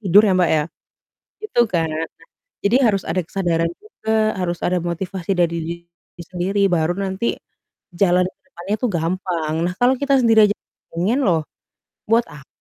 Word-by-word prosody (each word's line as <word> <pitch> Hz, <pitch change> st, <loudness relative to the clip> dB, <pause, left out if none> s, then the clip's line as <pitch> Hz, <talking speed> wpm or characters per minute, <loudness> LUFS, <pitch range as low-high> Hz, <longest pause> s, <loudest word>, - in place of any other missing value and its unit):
tidur 200 Hz, 0 st, +6 dB
ya, 195 Hz, -, +3 dB
Mbak, 175 Hz, -3 st, +3 dB
ya. 150 Hz, -, +1 dB, 0.8 s
Gitu 430 Hz, -, +1 dB
kan, 165 Hz, -2 st, +1 dB
nah, 155 Hz, +1 st, -2 dB, 0.6 s
jadi 200 Hz, +4 st, +3 dB
harus 200 Hz, -4 st, +2 dB
ada 180 Hz, +3 st, 0 dB
kesadaran 165 Hz, -1 st, -1 dB
juga, 220 Hz, -, -1 dB
harus 175 Hz, -1 st, -1 dB
ada 180 Hz, -, +1 dB
motivasi 175 Hz, +2 st, -4 dB
dari 170 Hz, -1 st, +2 dB, 0.3 s
diri 170 Hz, 0 st, -17 dB
sendiri, 185 Hz, +3 st, -1 dB
baru 165 Hz, 0 st, +2 dB
nanti 195 Hz, +3 st, -1 dB, 0.6 s
jalan 180 Hz, 0 st, +3 dB
ke 185 Hz, -, -13 dB
depannya 195 Hz, -2 st, -3 dB
tuh 250 Hz, -, +1 dB
gampang. 170 Hz, -2 st, -2 dB
Nah, 180 Hz, -, -1 dB
kalau 250 Hz, +2 st, +4 dB
kita 280 Hz, -1 st, +3 dB
sendiri 225 Hz, -2 st, +6 dB
aja -, -, -1 dB, 0.4 s
pengen 210 Hz, +11 st, +1 dB
loh 165 Hz, -3 st, +2 dB, 0.7 s
buat 230 Hz, +2 st, +4 dB
apa 140 Hz, -2 st, -13 dB
185 Hz, 160 wpm, -20 LUFS, 170-215 Hz, 0.8 s, tidur